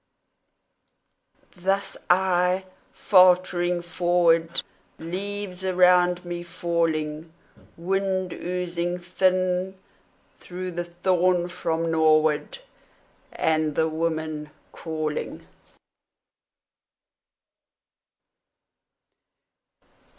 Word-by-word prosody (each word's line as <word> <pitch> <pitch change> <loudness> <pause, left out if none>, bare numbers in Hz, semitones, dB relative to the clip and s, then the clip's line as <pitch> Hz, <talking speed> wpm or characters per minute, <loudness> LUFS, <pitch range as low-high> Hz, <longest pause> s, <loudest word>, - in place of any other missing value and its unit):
Thus 195 +2 -1
I; 180 0 +2 0.3
faltering 180 -2 +3
forward, 170 -1 +1 0.3
Leaves 190 +2 -5
around 180 -1 +3
me 175 0 -5
falling, 165 -2 -2 0.5
Wind 185 +1 -1
oozing 175 0 -3
thin 185 +1 0 0.6
through 185 +1 -6
the 175 0 -4
thorn 180 0 +1
from 165 -2 -2
norward, 155 -1 +2 0.7
And 155 -2 0
the 160 - +2
woman 155 -1 -3 0.2
calling. 155 -2 -4
175 Hz, 60 wpm, -24 LUFS, 165-185 Hz, 0.7 s, faltering